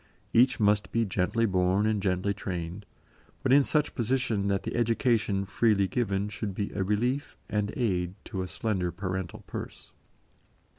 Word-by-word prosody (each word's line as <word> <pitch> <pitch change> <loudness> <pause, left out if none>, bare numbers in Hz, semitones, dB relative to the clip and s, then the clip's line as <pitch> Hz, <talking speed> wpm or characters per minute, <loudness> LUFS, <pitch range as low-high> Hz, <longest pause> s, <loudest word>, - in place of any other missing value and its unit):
Each 125 +3 +5
must 105 -1 +2
be 115 0 +2
gently 100 +4 +1
born 95 0 +2
and 110 -2 +1
gently 95 +1 0
trained, 90 +1 -5 0.6
but 130 - +3
in 140 0 +7
such 150 +1 0
position 120 -4 0
that 100 -1 0
the - - -4
education 115 -4 +1
freely 100 0 +2
given 100 -3 0
should 105 -2 -4
be 100 0 -2
a 100 - -2
relief 120 +8 -1
and 105 -1 -1
aid 90 -7 0
to 95 - -4
a 90 - -3
slender 95 -4 -1
parental 95 -2 -4
purse. - - -7
100 Hz, 155 wpm, -28 LUFS, 95-115 Hz, 0.6 s, in